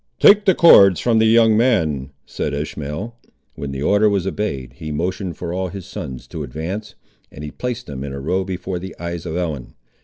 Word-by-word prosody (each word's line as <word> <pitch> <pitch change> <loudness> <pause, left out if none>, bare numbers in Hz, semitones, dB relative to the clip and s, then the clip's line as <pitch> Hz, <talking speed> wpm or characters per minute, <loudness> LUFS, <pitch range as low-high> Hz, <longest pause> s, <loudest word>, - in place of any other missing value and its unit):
"Take 205 0 +6
the 190 - +4
cords 100 - +7
from 115 -2 +2
the 110 - +4
young 115 -1 +5
man," 80 - +1 0.2
said 75 - -3
Ishmael. 75 +9 -5 0.4
When 70 - -6
the 70 +1 -4
order 105 +5 +4
was 100 -3 0
obeyed, 70 -11 -3
he 75 - -6
motioned 90 +3 -3
for 85 -1 -5
all 95 +1 -2
his 95 0 -8
sons 65 -2 -7
to - - -6
advance, 95 - -5 0.4
and 75 - -10
he 75 - -6
placed 125 -1 -4
them 70 -1 -7
in 70 - -5
a 70 - -5
row 90 +7 -1
before 95 -1 -4
the 95 +1 -8
eyes 85 -1 -5
of 80 - -4
Ellen. 80 -8 -4
90 Hz, 205 wpm, -20 LUFS, 75-105 Hz, 0.4 s, cords